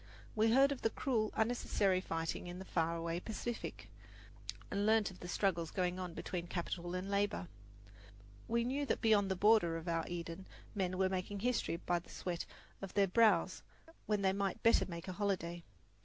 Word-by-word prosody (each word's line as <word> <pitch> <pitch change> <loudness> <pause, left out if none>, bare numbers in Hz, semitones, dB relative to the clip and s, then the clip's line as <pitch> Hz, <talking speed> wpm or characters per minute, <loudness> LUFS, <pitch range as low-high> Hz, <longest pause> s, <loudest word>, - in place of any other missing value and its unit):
We 220 +1 +4
heard 270 +3 +6
of 275 - -3
the 225 - +2
cruel, 225 -3 0
unnecessary 215 -4 +2
fighting 165 -1 -3
in 175 0 -6
the 190 - -7
far 165 -2 0
away 165 +1 -2
Pacific, 225 +4 -5 0.8
and 200 0 0
learned 215 -1 +3
of 185 - -14
the 175 - -7
struggles 175 -3 0
going 180 0 -1
on 180 -2 -5
between 175 -1 -4
capital 175 0 -3
and 185 +1 -3
labour. 200 -3 0 1.0
We 235 +1 +1
knew 270 +4 -1
that - - 0
beyond 210 -4 +4
the 190 - +1
border 195 -4 +4
of 165 +1 -8
our 165 -1 +1
Eden 170 +1 -5 0.3
men 185 -2 -1
were 190 0 +3
making 190 +2 -3
history 245 -7 +1
by 175 +1 0
the 170 - -18
sweat 175 -2 -4 0.3
of 195 -2 -7
their 200 -1 +5
brows 190 -2 +3 0.5
when 210 -2 +1
they 190 0 +3
might 200 +2 -2
better 230 - +5
make 170 -1 -7
a 185 - -3
holiday. 175 -4 -2
190 Hz, 185 wpm, -36 LUFS, 175-215 Hz, 1.0 s, heard